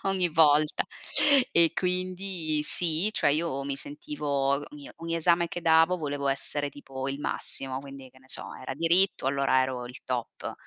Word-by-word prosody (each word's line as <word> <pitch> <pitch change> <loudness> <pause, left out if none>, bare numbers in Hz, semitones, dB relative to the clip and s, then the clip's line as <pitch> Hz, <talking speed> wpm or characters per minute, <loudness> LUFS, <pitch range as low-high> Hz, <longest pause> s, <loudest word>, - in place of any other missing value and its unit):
ogni 185 -2 +1
volta, 150 -2 +3 0.7
e 170 -1 +6
quindi 180 -3 -2
sì 170 +5 +2
cioè - - +2
io 145 -2 -1
mi 140 0 -4
sentivo 150 +1 -7 0.3
ogn 145 0 -10
ogni 165 0 -4
esame 170 +1 +2
che 175 - -6
davo 165 +2 +4
volevo 145 -3 -3
essere 145 +1 -1
tipo 135 -2 -8
il 140 +1 -5
massimo 135 -2 -2
quindi, 135 -1 -11
che 130 - -21
ne 130 0 -24
so, - - 0
era 130 +1 -7
diritto 170 +3 +2
allora 135 -1 +2
ero 130 -2 -4
il 125 +4 -12
top. 125 -2 -4
150 Hz, 165 wpm, -27 LUFS, 135-170 Hz, 0.7 s, e